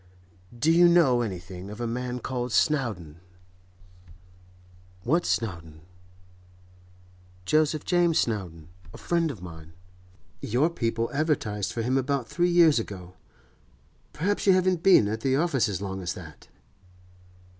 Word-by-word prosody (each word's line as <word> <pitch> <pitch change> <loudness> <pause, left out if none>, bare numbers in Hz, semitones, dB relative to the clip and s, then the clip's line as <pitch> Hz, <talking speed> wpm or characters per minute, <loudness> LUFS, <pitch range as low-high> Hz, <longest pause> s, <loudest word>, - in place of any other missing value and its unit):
'Do 150 +7 +2
you 175 +1 +6
know 155 -9 +4
anything 90 -3 -6
of 105 +2 -9
a 120 - -2
man 125 +1 -3
called 125 0 -4
Snowdon?' 110 - 0 1.9
'What 165 +10 +1
Snowdon?' 80 -8 -3 1.6
'Joseph 155 +5 +1
James 175 -2 +2
Snowdon—a 90 -5 -4
friend 170 -2 0
of 110 -11 -8
mine. 80 -2 -11 0.7
Your 135 +9 +1
people 115 -5 -2
advertised 140 -9 -1
for 115 - -3
him 130 +3 +1
about 135 -2 -2
three 175 +4 0
years 170 -6 +5
ago. 90 -5 -8 1.0
Perhaps 200 +7 -2
you 190 - +7
haven't 185 -2 +1
been 180 - +5
at 110 +2 -3
the 135 +1 +1
office 140 -7 +1
as 100 -1 -4
long 95 -1 -5
as 90 - -4
that? 80 -5 -12
120 Hz, 125 wpm, -26 LUFS, 95-155 Hz, 1.9 s, you